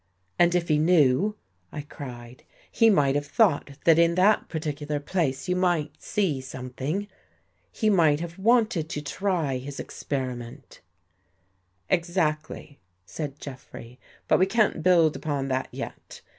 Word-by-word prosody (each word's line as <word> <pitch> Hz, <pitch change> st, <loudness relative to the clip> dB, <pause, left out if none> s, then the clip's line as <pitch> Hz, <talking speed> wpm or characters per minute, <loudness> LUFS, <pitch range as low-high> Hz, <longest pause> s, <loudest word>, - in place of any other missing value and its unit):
" 90 Hz, 0 st, -44 dB
And 175 Hz, 0 st, +4 dB
if 175 Hz, -1 st, 0 dB
he 150 Hz, -2 st, +2 dB
knew," 165 Hz, +4 st, +3 dB, 0.4 s
I 150 Hz, -, -5 dB
cried, 125 Hz, -4 st, -10 dB, 0.2 s
" -, -, -30 dB
he 225 Hz, -, +4 dB
might 145 Hz, -10 st, +3 dB
have 145 Hz, 0 st, -2 dB
thought 145 Hz, -7 st, +1 dB
that 165 Hz, -1 st, +5 dB
in 170 Hz, 0 st, +4 dB
that 200 Hz, +4 st, +3 dB
particular 150 Hz, -2 st, -3 dB
place 145 Hz, -3 st, -2 dB
you 180 Hz, -, +1 dB
might 170 Hz, -5 st, 0 dB
see 170 Hz, -10 st, -1 dB
something. 130 Hz, +9 st, -5 dB, 0.6 s
He 220 Hz, -, -1 dB
might 165 Hz, -8 st, +4 dB
have 170 Hz, +2 st, -7 dB
wanted 220 Hz, -6 st, +2 dB
to 150 Hz, -, -4 dB
try 165 Hz, -4 st, -1 dB
his 135 Hz, +2 st, -8 dB
ex -, -, -8 dB
periment." 130 Hz, -1 st, -5 dB, 0.6 s
" 95 Hz, +1 st, -44 dB, 0.3 s
Exactly," 160 Hz, -4 st, -1 dB, 0.3 s
said 145 Hz, -, -6 dB
Jeffrey. 125 Hz, -2 st, -10 dB
" -, -, -30 dB
But -, -, +4 dB
we 185 Hz, -, +4 dB
can't 215 Hz, -5 st, +1 dB
build 165 Hz, -3 st, +4 dB
upon 140 Hz, -3 st, -3 dB
that 130 Hz, 0 st, -1 dB
yet. -, -, -8 dB
150 Hz, 155 wpm, -26 LUFS, 135-180 Hz, 0.6 s, that